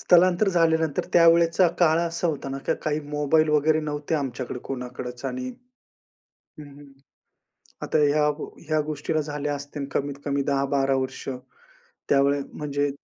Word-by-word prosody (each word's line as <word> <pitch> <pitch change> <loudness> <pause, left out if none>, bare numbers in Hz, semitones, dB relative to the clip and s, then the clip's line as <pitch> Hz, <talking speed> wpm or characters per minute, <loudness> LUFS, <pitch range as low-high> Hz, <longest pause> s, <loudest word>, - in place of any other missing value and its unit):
स्थलांतर 180 +3 +4
झाल्यानंतर 160 -4 +2
त्यावेळेचा 170 +1 +5
काळ 160 -1 +5
असा 170 +1 -1
होता 145 -3 -3
ना, 135 0 -4
की - - +2
काही 155 0 0
मोबाईल 150 +2 +2
वगैरे 155 +1 +3
नव्हते 150 +1 -3
आमच्याकडे 130 -3 -3
कोणाकडच 125 -1 -6
आणि 255 0 -3 1.1
हं, 150 - -9
हं, 145 +1 -14 1.0
आता - - 0
ह्या, 150 0 +3 0.4
ह्या 155 -1 +1
गोष्टीला 155 +1 -2
झाल्या 145 0 -3
असतील 140 0 -6
कमीतकमी 140 0 -2
10-12 135 -1 +1
वर्ष. 130 0 -4 0.8
त्यावेळी 140 +1 +3
म्हणजे 145 -1 -1
150 Hz, 130 wpm, -25 LUFS, 140-160 Hz, 1.1 s, त्यावेळेचा